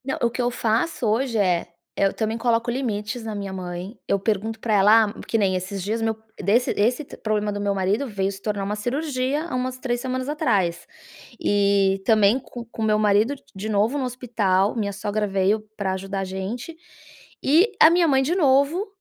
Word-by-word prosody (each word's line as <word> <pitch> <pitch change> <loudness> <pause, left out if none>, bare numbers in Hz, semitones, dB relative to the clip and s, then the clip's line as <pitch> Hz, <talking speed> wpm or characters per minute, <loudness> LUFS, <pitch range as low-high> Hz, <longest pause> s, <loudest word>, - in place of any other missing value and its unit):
Não. 265 - -2
O 235 - +3
que 250 +2 -3
eu 245 - +1
faço 240 +4 -1
hoje 230 +2 0
é, 180 -4 +1 0.3
eh, - - +2
eu - - -3
também 220 0 -2
coloco 235 0 +1
limites 235 -2 -3
na 220 -1 -5
minha 200 -1 -5
mãe. 180 +3 -6
Eu 200 - +1
pergunto 220 +2 -1
pra 220 -1 -1
ela 210 +3 +6
ah - - -8
que 225 - +1
nem 195 -3 +2
esses 185 +1 -4
dias, 220 +4 -2
meu 225 -1 0 0.2
desse 215 +6 +2
esse 245 +7 +1
problema 210 -1 -1
do 205 0 -4
meu 200 -1 0
marido 200 +8 0
veio 195 -3 -1
se 195 0 -10
tornar 205 -2 -2
uma 205 +2 -2
cirurgia 270 +5 -2
há 335 - -4
umas 255 0 -2
3 245 -2 -2
semanas 255 0 -3
atrás. 205 - 0 0.5
E 200 -1 +2
também 215 +1 +4
co 240 -2 -9
com 230 -1 -9
meu 215 -1 +3
marido 215 +5 +3
d - - -19
de 205 +3 -5
novo 215 +6 +1
no 270 - -1
hospital, 220 -6 0
minha 205 -3 -1
sogra 210 +1 -2
veio 195 +2 +1 0.2
pra 195 -2 -1
ajudar 195 +1 -4
a - - -1
gente. 195 - -5 0.7
E 335 - +4
a 315 - +10
minha 340 0 +3
mãe 270 -2 +3
de 320 +7 0
novo 295 +4 +3
220 Hz, 205 wpm, -23 LUFS, 200-250 Hz, 0.7 s, a